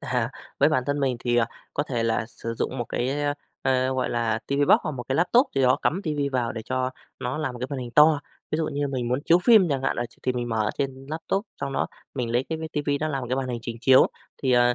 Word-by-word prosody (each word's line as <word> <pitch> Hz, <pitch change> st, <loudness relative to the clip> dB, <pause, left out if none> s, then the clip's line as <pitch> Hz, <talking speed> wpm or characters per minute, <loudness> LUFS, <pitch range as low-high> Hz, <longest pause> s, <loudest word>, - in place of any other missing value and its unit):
À, -, -, -1 dB, 0.3 s
với -, -, +6 dB
bản 130 Hz, -, +2 dB
thân 145 Hz, 0 st, 0 dB
mình 130 Hz, -3 st, +1 dB
thì, 120 Hz, -1 st, +1 dB
à, 115 Hz, -2 st, +4 dB, 0.3 s
có 145 Hz, -, +1 dB
thể 125 Hz, -5 st, -2 dB
là 115 Hz, -1 st, 0 dB
sử 115 Hz, 0 st, -6 dB
dụng 130 Hz, +3 st, -2 dB
một 120 Hz, -, -1 dB
cái, 125 Hz, -, -1 dB
ơ, 145 Hz, 0 st, +1 dB, 0.3 s
ờ, 130 Hz, 0 st, +2 dB
gọi 130 Hz, -1 st, 0 dB
là 115 Hz, -2 st, 0 dB
TV -, -, -4 dB, 0.2 s
Box -, -, +8 dB
hoặc -, -, -2 dB
một 130 Hz, -3 st, -5 dB
cái 135 Hz, -, +1 dB
laptop 235 Hz, -, +4 dB
gì 135 Hz, -, +2 dB
đó, 130 Hz, +1 st, +5 dB
cắm 185 Hz, +6 st, +1 dB
TV 155 Hz, -4 st, -2 dB, 0.2 s
vào, 120 Hz, -2 st, 0 dB
để 110 Hz, -1 st, -5 dB
cho 130 Hz, +1 st, -1 dB, 0.3 s
nó 125 Hz, +4 st, -2 dB
làm 155 Hz, -5 st, -2 dB
một -, -, -7 dB
cái 125 Hz, -, -3 dB
màn 140 Hz, -, -3 dB
hình 125 Hz, -1 st, -5 dB
to. 150 Hz, 0 st, +6 dB, 0.3 s
Ví -, -, +1 dB
dụ 160 Hz, 0 st, 0 dB
như 145 Hz, -1 st, -1 dB
mình 130 Hz, -3 st, -2 dB
muốn 125 Hz, +1 st, +1 dB
chiếu 170 Hz, -, +5 dB
phim 215 Hz, -7 st, +7 dB
chẳng 135 Hz, -3 st, -1 dB
hạn, -, -, 0 dB
là 120 Hz, -, -1 dB
ch 120 Hz, -, -22 dB
thì 130 Hz, -, +1 dB
mình 120 Hz, -1 st, -3 dB
mở 110 Hz, -2 st, 0 dB
trên 135 Hz, -1 st, -3 dB
laptop, 180 Hz, +6 st, -2 dB
xong 140 Hz, -, -2 dB
đó -, -, 0 dB, 0.3 s
mình 125 Hz, -4 st, -2 dB
lấy 120 Hz, +2 st, +2 dB
cái 160 Hz, -, -2 dB
mấy 160 Hz, 0 st, -5 dB
TV 150 Hz, -2 st, -3 dB
nó 155 Hz, -, 0 dB
làm 135 Hz, -3 st, -2 dB
một -, -, -4 dB
cái 130 Hz, -, 0 dB
màn 135 Hz, -1 st, -2 dB
hình 120 Hz, -1 st, -2 dB
trình 115 Hz, -1 st, -5 dB
chiếu. 130 Hz, +1 st, +7 dB, 0.4 s
Thì, 130 Hz, -2 st, +2 dB
ờ, 120 Hz, 0 st, +5 dB
130 Hz, 290 wpm, -25 LUFS, 120-145 Hz, 0.4 s, Box